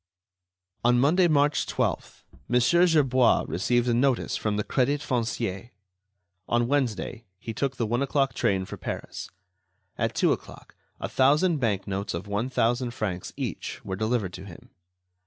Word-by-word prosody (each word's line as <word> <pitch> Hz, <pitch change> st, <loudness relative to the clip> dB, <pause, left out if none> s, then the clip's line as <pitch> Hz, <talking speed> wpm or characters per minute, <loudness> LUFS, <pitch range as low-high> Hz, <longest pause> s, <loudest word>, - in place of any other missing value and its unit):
On 120 Hz, +1 st, +4 dB
Monday, 170 Hz, +7 st, +4 dB
March 145 Hz, -2 st, +2 dB
12th, -, -, -2 dB, 0.2 s
Mon. 125 Hz, -, +3 dB, 0.3 s
Gerbois 130 Hz, -7 st, +3 dB
received 120 Hz, +9 st, +1 dB
a 120 Hz, -, +2 dB
notice 125 Hz, +1 st, +1 dB
from 105 Hz, -1 st, -1 dB
the 105 Hz, -, 0 dB
Crédit 140 Hz, +6 st, +1 dB
Foncier. 115 Hz, -5 st, -2 dB, 0.8 s
On 120 Hz, 0 st, +1 dB
Wednesday, 120 Hz, -4 st, -1 dB
he 110 Hz, +4 st, -6 dB
took 135 Hz, +4 st, -2 dB
the 115 Hz, -, 0 dB
one 120 Hz, +4 st, 0 dB
o'clock 135 Hz, 0 st, +1 dB
train 95 Hz, -1 st, 0 dB
for -, -, -8 dB
Paris. -, -, -6 dB, 0.7 s
At -, -, 0 dB
two -, -, +3 dB
o'clock, -, -, -10 dB, 0.3 s
a -, -, -3 dB
thousand 150 Hz, +6 st, +3 dB
bank 105 Hz, -6 st, 0 dB
notes 100 Hz, -2 st, -3 dB
of 85 Hz, -, -5 dB
one 105 Hz, +5 st, -2 dB
thousand 120 Hz, 0 st, 0 dB
francs 90 Hz, -5 st, -3 dB
each -, -, -5 dB
were 95 Hz, -, -3 dB
delivered 110 Hz, -2 st, -1 dB
to 95 Hz, -, -8 dB
him. 90 Hz, -4 st, -13 dB
120 Hz, 155 wpm, -26 LUFS, 105-135 Hz, 0.8 s, On